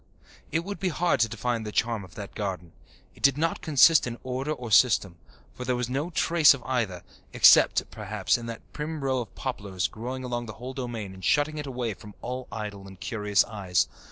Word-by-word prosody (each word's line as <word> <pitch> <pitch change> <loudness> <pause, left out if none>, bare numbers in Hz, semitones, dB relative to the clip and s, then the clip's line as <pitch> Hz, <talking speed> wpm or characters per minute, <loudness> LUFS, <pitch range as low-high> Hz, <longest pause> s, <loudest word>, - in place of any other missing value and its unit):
It 165 +2 0
would 200 +2 -6
be 190 - 0
hard 175 +1 +1
to 115 0 +3
define 115 +1 -2
the 105 -1 -5
charm 115 -1 0
of 90 -3 -14
that 100 -1 -8
garden. 95 -5 -4 0.4
It - - -19
did 140 0 +4
not 165 +2 0
consist 155 0 +5
in 120 -1 -5
order 130 +3 -3
or 125 -6 -5
system, 100 -7 +4 0.3
for 125 - -7
there 125 0 0
was 125 0 -2
no 145 +6 -1
trace 165 -4 +5
of 125 - -12
either, 110 -9 -2 0.3
except, - - +6
perhaps, 105 -2 -1
in 120 -1 -4
that 115 -1 -7
prim 150 0 -4
row 130 -1 +1
of 120 - -7
poplars 100 -8 -3
growing 125 +4 -6
about 120 -1 -3
the 110 - -7
whole 125 +5 -8
domain 120 -7 -5
and 95 0 -13
shutting 150 +7 +2
it 145 - -5
away 125 -4 -3
from 105 +2 -13
all 125 +1 -4
idle 105 -3 -6
and 95 -1 -13
curious 105 -4 +1
eyes. 95 -5 0
120 Hz, 210 wpm, -27 LUFS, 105-135 Hz, 0.4 s, except